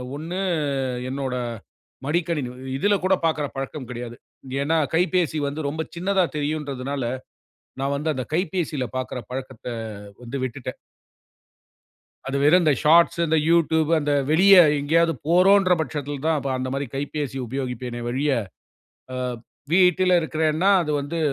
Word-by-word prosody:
ஒண்ணு 165 +5 -5 0.7
என்னோட 135 -1 -3 0.7
மடிக்கணி. 170 0 0 0.4
இதுல 205 +8 +3
கூடப் 185 -3 +2
பாக்குற 155 -2 +1
பழக்கம் 135 -1 -5
கிடையாது. 120 -1 -6 0.4
ஏன்னா 155 +4 +1 0.2
கைபேசி 175 -2 +1
வந்து 145 +3 -4
ரொம்ப 155 +2 -2
சின்னதா 190 +1 +2
தெரியும்ன்றதுனால 145 -2 -3 0.8
நான் 140 +1 0
வந்து 155 +3 -1
அந்தக் 130 +1 -6
கைபேசியில 165 -5 -1
பார்க்கிற 130 -1 -3
பழக்கத்த 130 -3 -7 0.6
வந்து 125 +3 -5
விட்டுட்டேன். 130 0 -6 1.5
அது 135 - -1
வேற 150 +4 +5
இந்தச் 150 -6 +2
ஷார்ட்ஸ், 170 +2 +5
இந்த 160 0 +2
YouTube 160 -2 +3
அந்த 145 -1 0 0.2
வெளிய 195 +5 +7 0.3
எங்கையாவது 165 +3 +3 0.2
போறோம்ன்ற 185 +2 +5
பட்சத்தில 145 -2 -3
தான் 160 -1 +2
ப 140 - -1
அந்த 130 0 -3
மாரி 140 0 -2
கைபேசி 145 -1 -3
உபயோகிப்பேனே 125 -1 -4
வழிய. 135 +4 0 1.4
வீட்டில 180 0 +5
இருக்கிறேன்னா 160 +4 +1
அது 150 - -2
வந்து 145 +4 -4
150 Hz, 125 wpm, -23 LUFS, 135-170 Hz, 1.5 s, வெளிய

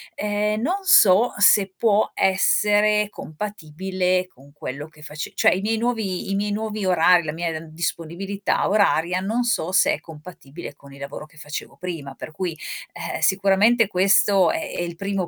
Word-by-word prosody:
ehm, 210 +1 -1
non 355 +9 0
so 225 - +5
se 200 -2 +4
può 215 -2 +2
essere 210 +2 +2
compatibile 185 +1 -3
con 140 -3 -21
quello 145 +1 -7
che 155 -1 -20
face 150 +1 -7
cioè - - +3
i - - -4
miei 220 +2 -1
nuovi 220 -5 -2
i - - 0
miei 205 +1 -1
nuovi 215 -1 -3
orari, 180 -1 +4
la 155 - -3
mia, 170 0 -3
mhmm, 165 - -12
disponibilità 170 +5 -5 0.2
oraria 185 -4 +2
non 225 +5 -1
so 185 -7 -1
se - - +4
è - - -4
compatibile 155 -2 -11
con 140 -1 -16
il 140 - -14
lavoro 140 +2 -7
che 155 +1 -24
facevo 150 0 -7
prima. 160 -7 -6
Per 155 - -8
cui, 170 -1 -4 0.4
eh, - - -5
sicuramente 195 +6 +3
questo 195 0 +3
è - - -3 0.2
è - - -1
il 170 -1 -5
primo 195 -1 -3
190 Hz, 175 wpm, -22 LUFS, 160-210 Hz, 0.4 s, so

